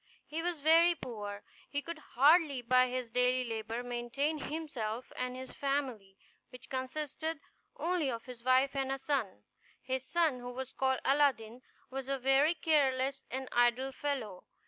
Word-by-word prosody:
He 315 +2 -4
was 340 -3 -2
very 330 +3 +6
poor. 205 -7 -6 0.3
He 285 0 -2
could 335 +1 -6
hardly, 290 -1 +4
by 255 +1 +5
his 250 -2 -3
daily 250 +1 +2
labor, 225 +1 -3
maintain 245 +6 -2
himself 255 -8 -4
and 250 0 -3
his 260 0 -8
family, 255 -9 -2 0.3
which 250 0 -13
consisted 295 +4 -3 0.4
only 345 -5 0
of 230 -2 -4
his 250 -2 -10
wife 260 +2 +3
and 270 -1 -1
a 270 - 0
son. 265 - -2 0.4
His 260 0 -3
son, 315 -2 +1
who 245 0 -6
was 260 +1 -6
called 265 -1 +1
Aladdin, 255 -5 +2 0.3
was 265 0 -4
a 275 0 0
very 270 +5 +3
careless 275 -4 +2
and 265 0 -4
idle 240 +2 +3
fellow. 260 -9 -4
265 Hz, 155 wpm, -33 LUFS, 245-290 Hz, 0.4 s, very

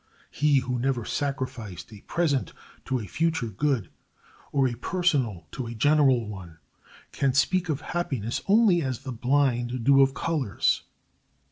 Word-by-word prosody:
He 145 -1 +3
who 125 -1 -2
never 125 -2 -1
sacrificed 130 -8 -4
a 100 - -12
present 150 -6 -1 0.3
to 130 - 0
a 110 - -6
future 160 - 0
good, 115 - -1 0.6
or 135 -2 +3
a 120 - -2
personal 130 - 0
to 125 -3 -5
a 115 - -6
general 135 -2 +3
one, 95 -5 -9 0.5
can 135 -2 0
speak 175 +6 +2
of 150 -1 -1
happiness 130 -12 -3
only 200 -4 +5
as 130 -5 -3
the 130 - -5
blind 125 -1 0
do 140 +2 +6
of 135 0 +3
colors. 150 -11 0
130 Hz, 145 wpm, -26 LUFS, 120-150 Hz, 0.6 s, do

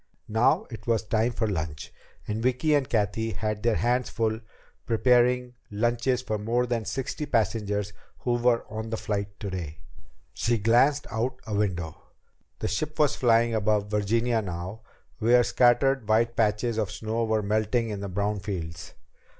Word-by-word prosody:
Now 135 - +3
it 110 -3 -9
was 115 -2 +2
time 110 +2 +1
for 115 -1 -1
lunch, 80 -6 -4 0.3
and 105 +1 -2
Vicki 130 +5 +2
and 140 -3 +2
Cathy 110 0 0
had 105 +2 -3
their 115 -1 +2
hands 125 +1 +1
full 110 -1 -1 0.5
preparing 125 +1 +3 0.2
lunches 120 +4 0
for 110 -3 -2
the - - -8
more 120 +3 +1
than 120 -3 -2
sixty 135 +5 -3
passengers 105 -4 0 0.2
who 120 - -1
were 120 -1 +2
on 110 +1 -5
the 115 - -2
flight 100 -2 -3
today. 90 -6 -5 0.6
She 120 0 +1
glanced 120 +7 +3
out 115 +3 -2
a 110 - -5
window. 90 -6 -2 0.6
The - - -2
ship 155 0 -3
was 150 -3 +3
flying 115 -1 +3
above 105 -1 +1
Virginia 115 +3 +1
now, 90 +3 -6 0.4
where 120 +2 +5
scattered 125 0 +3
white 115 +2 +3
patches 110 +1 +1
of 105 -4 0
snow 110 +1 -2
were 110 -1 0
melting 110 +3 0
in 105 - -4
the 100 0 -5
brown 100 +3 -1
fields. 90 -5 -6
110 Hz, 160 wpm, -27 LUFS, 105-120 Hz, 0.6 s, where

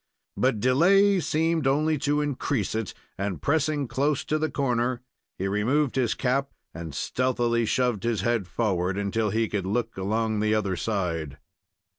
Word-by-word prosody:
But 125 -4 +1
delay 185 - +4
seemed 160 -2 +1
only 150 +2 +2
to 145 +2 +1
increase 140 -6 -1
it, 110 -3 -3 0.2
and, 100 -5 -2
pressing 150 -1 0
close 140 +3 0
to 155 - 0
the 155 0 0
corner, 125 -2 -1 0.3
he 95 - -2
removed 120 +8 +1
his 125 -4 +1
cap 135 +2 0 0.2
and 80 -3 -7
stealthily 120 - 0
shoved 125 -5 +1
his 115 -4 0
head 115 -3 0
forward 95 -3 -1
until 105 +2 0
he 110 +2 +1
could 100 -3 -3
look 115 +3 -1
along 110 +3 0
the 110 +1 +2
other 100 -3 0
side. 85 -9 -2
120 Hz, 155 wpm, -26 LUFS, 100-140 Hz, 0.3 s, delay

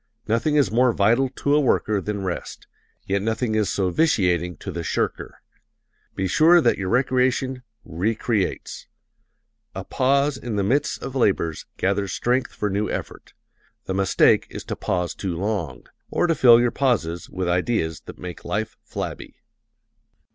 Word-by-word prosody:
Nothing 115 +7 +1
is 140 -10 +3
more 125 +2 +4
vital 115 +7 +3
to 140 +2 -1
a 150 - +5
worker 110 -7 +1
than 100 +1 -4
rest 90 -2 -5 0.4
yet 100 +1 0
nothing 110 +2 -1
is 110 -2 +1
so 95 -2 0
vitiating 90 - +1
to 95 - -7
the 85 -1 -4
shirker. 80 - -3 0.7
Be 95 - -1
sure 165 - +5
that 160 - +2
your 95 -1 -2
recreation 130 +1 +1 0.2
re 95 +8 -1
creates. 110 -3 -2 0.9
A - - -4
pause 140 +2 +1
in 120 -4 -5
the 100 - +1
midst 130 +9 0
of 135 - -5
labors 95 - 0
gathers 100 0 0
strength 125 +2 0
for 105 - -3
new 105 +2 -1
effort. - - -6 0.5
The 95 - -3
mistake 95 0 +3
is - - -7
to - - -5
pause 90 -1 -2
too 95 -4 -4
long, 90 - -3 0.2
or - - +1
to 170 - +2
fill 120 -5 +7
your 120 -1 +2
pauses 95 -11 -1
with 90 -1 -3
ideas 90 -3 0
that - - -9
make 90 -1 -8
life 105 +5 -3
flabby. - - -6
105 Hz, 160 wpm, -23 LUFS, 95-130 Hz, 0.9 s, fill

